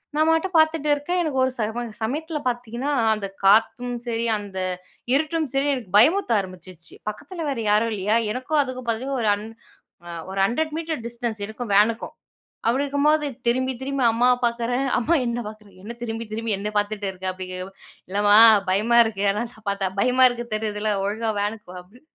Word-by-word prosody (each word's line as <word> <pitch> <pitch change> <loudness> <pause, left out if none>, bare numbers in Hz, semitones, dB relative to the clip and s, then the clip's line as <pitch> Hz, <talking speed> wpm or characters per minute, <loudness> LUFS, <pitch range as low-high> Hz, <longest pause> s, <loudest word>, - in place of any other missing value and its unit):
நான் 310 +1 +3
பாட்டுக்கு 325 +2 +2
பாத்துட்ருக்கேன் 315 +1 +2
எனக்கு 300 -6 -1
ஒரு 260 - +1
சம 220 +1 -2 0.2
சமயத்தில 305 +7 -2
பாத்திங்கன்னா, 245 +2 -2 0.2
அந்த 210 -2 -4 0.2
காத்தும் 230 +5 +3
சரி, 230 -1 -2
அந்த 200 -2 -6 0.5
இருட்டும் 315 +2 +1
சரி 275 +1 +1
எனக்கு 235 -9 -6
பயமுறுத்த 315 - +4
ஆரம்பிச்சிச்சு. 185 -3 -8
பக்கத்துல 330 - -5
வேற 275 - -2
யாரும் 215 +2 +3
இல்லையா? 210 +2 0 0.2
எனக்கும் 260 +5 -1
அதுக்கும் 255 -2 -5
பாத்தீங்கன்னா 260 +4 -2
ஒரு 215 - +2
அன் 205 - -8 0.6
அ - - -7 0.2
ஒரு 195 +1 -4
100 310 +9 -1
மீட்டர் 320 -5 -3
டிஸ்டன்ஸ் 235 -2 -4
இருக்கும். 220 +1 -6
வேனுக்கும். 220 +3 +2 0.5
அப்டி 255 +5 +2
இருக்கும்போது 295 +2 +2 0.2
திரும்பி, 260 +2 +1
திரும்பி 275 0 -2
அம்மாவ 245 +2 +3
பாக்குறேன். 240 +2 -1
அம்மா 315 +8 +2
என்னை 240 0 -2
பார்க்குறாங்க. 210 -3 -15
"என்ன 235 +2 -7
திரும்பி, 225 0 -4
திரும்பி 225 -1 -1
என்னை 210 +1 -3
பார்த்துட்ருக்க?" 200 -3 -2
அப்படிங்கிறப்ப 185 +1 -7 0.4
"இல்லம்மா 205 +2 +4 0.3
பயமா 220 +5 +2
இருக்கு, 215 -3 -3
எதனாச்சு 220 +2 -3
பாத்தா, 200 -1 -1
பயமா 255 +2 +5
இருக்கு. 240 -1 -5
தெரியுதுல 215 0 -2
ஒழுங்கா 220 +2 -1
வேனுக்கு 210 -1 -4
வா" - - -8
அப்படி. 210 +8 -21
235 Hz, 165 wpm, -23 LUFS, 210-270 Hz, 0.6 s, பயமா